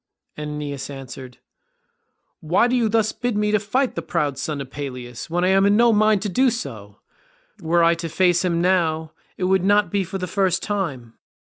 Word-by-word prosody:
And 150 0 -5
Aeneas 145 -2 -5
answered, 130 -2 -9 1.0
"Why 175 +8 +2
do 250 - 0
you 235 -3 +2
thus 220 0 +2
bid 245 -2 -2
me 210 0 +1
fight 250 +6 0
the 170 - -4
proud 150 -4 -2
son 150 -2 -3
of 135 -1 -7
Peleus, 125 -4 -7
when 175 +2 0
I 185 - +3
am 195 0 +4
in 205 +1 +4
no 235 0 +5
mind 215 -1 +3
to - - -1
do 255 +8 +3
so? 110 - -7 0.6
Were 170 +1 +2
I 165 0 +5
to 165 0 -5
face 175 +1 +2
him 170 -2 0
now, 160 -4 +1 0.3
it - - -4
would 190 0 +2
not 205 -2 +3
be 200 -1 +1
for 190 +2 -5
the 185 - -3
first 185 -1 0
time. 140 - -4
175 Hz, 200 wpm, -22 LUFS, 150-205 Hz, 1.0 s, no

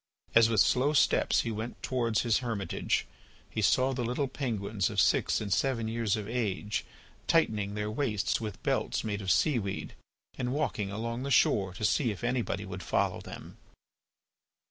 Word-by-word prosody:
As 115 0 +6
with 110 -3 +4
slow 135 +4 +3
steps 145 - +3
he 115 - -3
went 110 +3 -6
towards 120 -4 0
his 115 -3 +2
hermitage 110 -8 -1 0.5
he 110 - -2
saw 130 +5 +3
the 125 -1 -2
little 125 +4 -1
penguins 110 -7 -2
of - - -2
six - - +3
and 100 -3 -1
seven 120 -3 0
years 115 -2 0
of 105 -2 -5
age 105 -3 -2 0.4
tightening 105 -11 +2
their 105 0 -2
waists 110 -5 0
with 105 -3 -6
belts - - 0
made 105 -2 -3
of 95 - -4
sea 130 - +3
weed 100 -2 -4 0.5
and 125 0 -1
walking 110 -9 -1
along 115 +3 -3
the 140 - -3
shore 95 -8 +3
to 110 - -2
see 125 +1 +2
if 105 +2 -5
anybody 120 -5 -1
would 95 0 -7
follow - - 0
them. - - -10
110 Hz, 170 wpm, -30 LUFS, 105-125 Hz, 0.5 s, As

